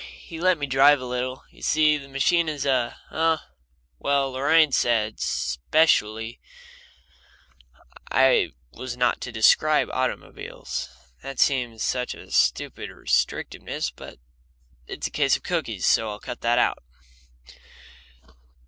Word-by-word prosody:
He 165 Hz, -2 st, -10 dB
let 185 Hz, 0 st, +3 dB
me 145 Hz, -, -2 dB
drive 140 Hz, +2 st, +5 dB
a 130 Hz, -, -7 dB
little. 125 Hz, +1 st, -4 dB
You -, -, -20 dB
see, 155 Hz, -1 st, +3 dB
the 140 Hz, -2 st, -7 dB
machine 160 Hz, +5 st, +2 dB
is 150 Hz, -2 st, -4 dB
a 130 Hz, -3 st, 0 dB
Oh, 160 Hz, 0 st, +2 dB, 0.6 s
well, 140 Hz, -1 st, +1 dB
Lorraine 145 Hz, +4 st, +3 dB
said, 110 Hz, -4 st, +1 dB
specially, 110 Hz, -, +1 dB, 1.7 s
I 130 Hz, -, +3 dB, 0.2 s
was 125 Hz, -, -7 dB
not 125 Hz, -1 st, +1 dB
to 125 Hz, -, -5 dB
describe 150 Hz, +7 st, +3 dB
automobiles. 130 Hz, 0 st, -4 dB, 0.3 s
That 135 Hz, -1 st, -8 dB
seems 120 Hz, -5 st, +1 dB
such 125 Hz, -1 st, -2 dB
a -, -, -14 dB
stupid -, -, 0 dB
restrictiveness, -, -, -2 dB
but -, -, -11 dB, 0.7 s
it's -, -, -6 dB
a -, -, -3 dB
case -, -, +2 dB
of -, -, -22 dB
cookies, -, -, -2 dB
so 110 Hz, -, +3 dB
I'll 105 Hz, 0 st, -6 dB
cut 125 Hz, +2 st, -8 dB
that 120 Hz, +1 st, +2 dB
out. 120 Hz, -, +1 dB
130 Hz, 130 wpm, -24 LUFS, 120-150 Hz, 1.7 s, drive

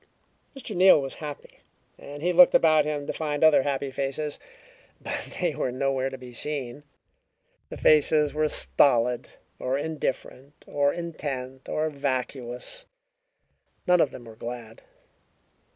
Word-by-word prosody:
Mr. 235 Hz, -6 st, -7 dB
Neal 185 Hz, -2 st, +7 dB
was 135 Hz, -1 st, -4 dB
happy, 150 Hz, -2 st, -8 dB, 0.4 s
and 145 Hz, +1 st, -10 dB
he 180 Hz, +1 st, +1 dB
looked 180 Hz, +1 st, +7 dB
about 155 Hz, -2 st, +5 dB
him 150 Hz, -1 st, -3 dB
to -, -, -3 dB
find 150 Hz, -1 st, -2 dB
other 155 Hz, -3 st, +6 dB
happy 140 Hz, 0 st, -2 dB
faces. 140 Hz, +3 st, -3 dB, 0.6 s
But -, -, -6 dB
they 175 Hz, -3 st, 0 dB
were 130 Hz, -, -2 dB
nowhere 135 Hz, +1 st, -1 dB
to 135 Hz, -, -8 dB
be 125 Hz, -1 st, -11 dB
seen; 140 Hz, 0 st, -4 dB, 0.9 s
the -, -, -8 dB
faces 150 Hz, 0 st, +4 dB
were 155 Hz, 0 st, +1 dB
stolid, 125 Hz, -5 st, +2 dB, 0.3 s
or 130 Hz, +1 st, -1 dB
indifferent, 145 Hz, -2 st, -5 dB
or 145 Hz, 0 st, +1 dB
intent, 135 Hz, -6 st, -6 dB
or 155 Hz, +1 st, 0 dB
vacuous. 130 Hz, -, -4 dB, 1.0 s
None 180 Hz, -1 st, +4 dB
of 145 Hz, -, +3 dB
them 120 Hz, -, -11 dB
were 115 Hz, -1 st, -12 dB
glad. 115 Hz, -1 st, -8 dB
145 Hz, 135 wpm, -26 LUFS, 130-155 Hz, 1.0 s, Neal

